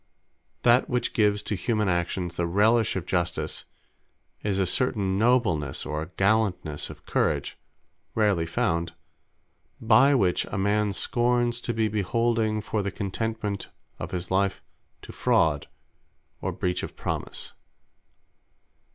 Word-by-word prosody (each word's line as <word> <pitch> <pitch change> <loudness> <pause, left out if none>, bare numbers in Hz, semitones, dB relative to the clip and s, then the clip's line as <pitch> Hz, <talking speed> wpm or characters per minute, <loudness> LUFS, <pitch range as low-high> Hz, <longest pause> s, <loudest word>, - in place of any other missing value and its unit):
That 120 +2 +4
which 125 -2 -1
gives 105 -2 +2
to - - -2
humane 105 +2 0
Actions 85 0 -1
the 85 - -1
relish 110 +5 +3
of 95 -3 -3
Justice, 85 -1 -1 0.8
is 100 -2 -1
a 95 - +2
certain 100 -4 +1
Noblenesse 105 - +2
or 75 +3 -3
Gallantnesse 95 -7 +1
of - - -12
courage, - - 0 0.6
(rarely 100 -7 +2
found,) 85 0 -1 0.9
by 125 +5 +5
which 95 -8 +2
a - - -5
man 105 +1 +1
scorns 120 +3 +1
to 120 - -2
be 110 -1 +2
beholding 110 +1 0
for 105 0 -2
the 100 - -2
contentment 105 +1 -3 0.3
of - - -5
his 90 0 -4
life, 95 +1 +1 0.4
to - - -9
fraud, 75 -3 +2 0.7
or - - -1
breach 90 0 -1
of - - -7
promise. - - -4
100 Hz, 125 wpm, -26 LUFS, 90-115 Hz, 0.9 s, by